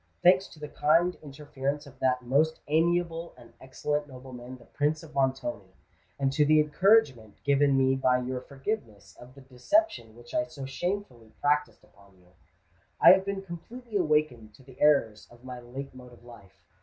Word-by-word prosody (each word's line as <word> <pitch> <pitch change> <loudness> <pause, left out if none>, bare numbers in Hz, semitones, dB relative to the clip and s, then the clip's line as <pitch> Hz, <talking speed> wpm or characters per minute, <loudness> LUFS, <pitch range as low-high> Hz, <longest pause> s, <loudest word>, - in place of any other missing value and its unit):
Thanks 185 +2 +5
to 155 - -16
the 150 - -6
kind 165 +5 +2
interference 145 0 -5
of 135 -2 -16
that 125 -1 +1
most 150 +6 +1
amiable 170 +2 0
and 120 -2 -17
excellent 145 +3 -3
nobleman 130 -1 -10
the - - -19
Prince 150 +2 -1
of 155 -1 -13
Montoni, 130 -8 -2 0.4
and 135 -1 0
to 150 +1 +3
the 155 +1 +4
encouragement 150 - +2
given 140 -1 +3
me 130 0 +3
by 130 -1 +2
your 125 0 -4
forgiveness 135 - -6
of 125 +2 -14
the 140 - -14
deception 130 - -1
which 120 0 -15
I 155 - +1
so 145 -3 -9
shamefully 135 - -5
practised 145 -6 0
upon 100 -1 -23
you, 90 -1 -25 0.7
I - - +9
have 190 +1 +4
been 200 -1 -4
completely 220 +6 -10
awakened 150 - 0
to 130 - -19
the 130 -1 -17
errors 115 -8 +2
of 120 0 -19
my 125 -1 -8
late 130 +3 -8
mode 125 -1 -13
of 120 - -18
life. 100 -7 -16
135 Hz, 175 wpm, -28 LUFS, 125-155 Hz, 0.7 s, I